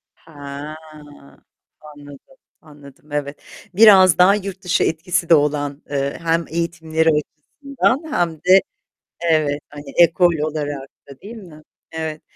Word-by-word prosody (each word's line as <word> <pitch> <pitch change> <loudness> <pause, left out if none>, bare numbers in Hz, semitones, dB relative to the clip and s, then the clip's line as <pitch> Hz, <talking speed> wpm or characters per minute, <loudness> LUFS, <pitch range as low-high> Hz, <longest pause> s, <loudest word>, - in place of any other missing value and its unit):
Ha, 145 -1 -10 1.1
anladım, 145 -3 -15 0.2
anladım, 145 -1 -17
evet. 145 0 -4 0.3
Biraz 190 -5 +7
daha 185 +3 +5
yurt 195 -2 -6
dışı 180 -1 +1
etkisi 170 +2 -2
de 165 - +7
olan, 145 -1 -1
eee, 140 -1 -3
hem 165 0 0
eğitimleri 160 -1 -1
açısından, 250 - -2
hem 175 - 0
de, 185 +5 +4 0.6
evet, 155 -3 0
hani, 145 -1 -11
ekol 175 0 +4
olarak 145 -3 -4 0.2
da 140 -1 -14
değil 225 +4 -10
mi? 170 -8 -13 0.3
Evet. 160 -1 -5
160 Hz, 120 wpm, -19 LUFS, 145-175 Hz, 1.1 s, Biraz